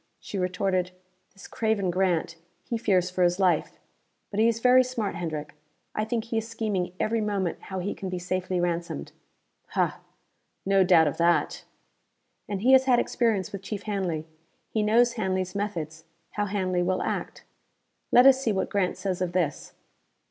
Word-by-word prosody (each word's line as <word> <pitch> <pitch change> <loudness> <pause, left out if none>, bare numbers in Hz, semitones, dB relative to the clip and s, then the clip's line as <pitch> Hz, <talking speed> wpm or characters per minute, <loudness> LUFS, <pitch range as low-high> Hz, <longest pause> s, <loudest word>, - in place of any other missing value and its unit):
She 200 - -6
retorted, 180 0 0 0.4
"This 195 - -13
craven 220 -5 0
Grant, 175 -2 0 0.3
he 235 - -3
fears 185 -5 +1
for 185 - -2
his 175 0 +3
life 185 -2 +1 0.5
but 205 - -2
he 225 - +5
is 230 -1 +1
very 250 +2 +6
smart, 235 -6 -3
Hendrick. 155 -4 -5 0.4
I 215 - -1
think 225 0 -2
he 225 -1 -1
is 225 - -6
scheming 205 -6 -2
every 225 +1 0
moment 200 -4 -2
how 190 - -5
he 185 +2 -2
can 190 - -6
be 185 - -3
safely 185 0 -2
ransomed." 170 - -2 0.6
"Hah! - - -1 0.7
No 195 0 +4
doubt 175 -3 +5
of 145 - -2
that!" 170 0 +1 0.8
"And 200 -2 -3
he 250 +4 +4
has 265 0 +7
had 255 -2 +4
experience 225 -6 0
with 200 - -6
Chief 205 +1 -5
Hanley. 185 -7 -2 0.5
He 220 - 0
knows 235 +3 +4
Hanley's 185 -4 -2
methods, 165 -6 -4 0.3
how 205 - -1
Hanley 185 -3 0
will 185 +1 0
act. - - -4 0.7
Let 245 +1 +7
us 265 -1 +7
see 230 - +1
what 190 -2 -1
Grant 195 -3 0
says 185 -1 -3
of 180 -1 -1
this." 170 -6 -1
190 Hz, 170 wpm, -26 LUFS, 180-220 Hz, 0.8 s, has